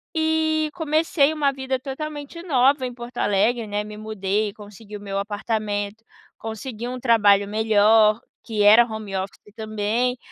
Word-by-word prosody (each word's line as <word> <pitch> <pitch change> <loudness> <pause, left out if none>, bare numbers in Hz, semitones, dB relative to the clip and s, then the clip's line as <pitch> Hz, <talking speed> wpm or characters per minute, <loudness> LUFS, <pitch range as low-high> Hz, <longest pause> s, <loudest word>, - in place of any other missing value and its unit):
e 315 -1 +1
comecei 315 -2 +1
uma 295 -3 +1
vida 265 -1 -3
totalmente 290 +4 -7
nova 270 -3 +2
em 245 - -5
Porto 240 0 -10
Alegre, 215 +3 +1
né, 205 0 -2
me 210 0 -9
mudei 215 -1 -2
e 200 - -11
consegui 210 0 -12
o - - -13
meu 195 -1 -3
apartamento, 205 0 -3 0.3
consegui 225 +1 -6
um 255 0 -5
trabalho 205 -5 +4
melhor 215 0 +4 0.3
que 215 -3 -1
era 220 +3 +7
home 220 -3 -7
office 195 +2 -6
também. 220 +3 -1
220 Hz, 150 wpm, -23 LUFS, 210-265 Hz, 0.3 s, era